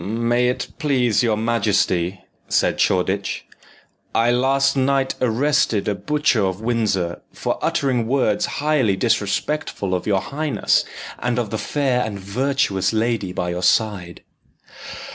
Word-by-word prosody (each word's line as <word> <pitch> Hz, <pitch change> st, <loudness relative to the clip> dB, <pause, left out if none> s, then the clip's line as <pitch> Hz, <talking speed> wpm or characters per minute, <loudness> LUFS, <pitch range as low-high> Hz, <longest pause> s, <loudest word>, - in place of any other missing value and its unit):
"May 120 Hz, +3 st, +1 dB
it 125 Hz, -, -2 dB
please 125 Hz, -8 st, +2 dB
your 115 Hz, -3 st, +1 dB
majesty," 100 Hz, -5 st, 0 dB, 0.3 s
said -, -, +1 dB
Shoreditch, 95 Hz, +2 st, 0 dB, 0.7 s
"I 115 Hz, +1 st, +3 dB
last 135 Hz, +2 st, +2 dB
night 135 Hz, 0 st, +1 dB
arrested 125 Hz, -2 st, +1 dB
a 105 Hz, -, +1 dB
butcher 150 Hz, -2 st, +1 dB
of 95 Hz, 0 st, -1 dB
Windsor 105 Hz, -7 st, -1 dB
for -, -, -3 dB
uttering 125 Hz, -5 st, 0 dB
words 125 Hz, -5 st, +1 dB
highly 145 Hz, -9 st, +2 dB
disrespectful 105 Hz, 0 st, -1 dB
of 90 Hz, -, -2 dB
your 100 Hz, -2 st, +2 dB
highness, 145 Hz, +7 st, 0 dB, 0.3 s
and 120 Hz, 0 st, -1 dB
of 115 Hz, -4 st, -2 dB
the 110 Hz, -, -2 dB
fair 135 Hz, -4 st, 0 dB
and 100 Hz, -2 st, -5 dB
virtuous 100 Hz, -2 st, 0 dB
lady 110 Hz, -4 st, 0 dB
by 90 Hz, -1 st, -2 dB
your 90 Hz, +1 st, -3 dB
side." 95 Hz, -4 st, 0 dB
115 Hz, 130 wpm, -21 LUFS, 100-130 Hz, 0.7 s, I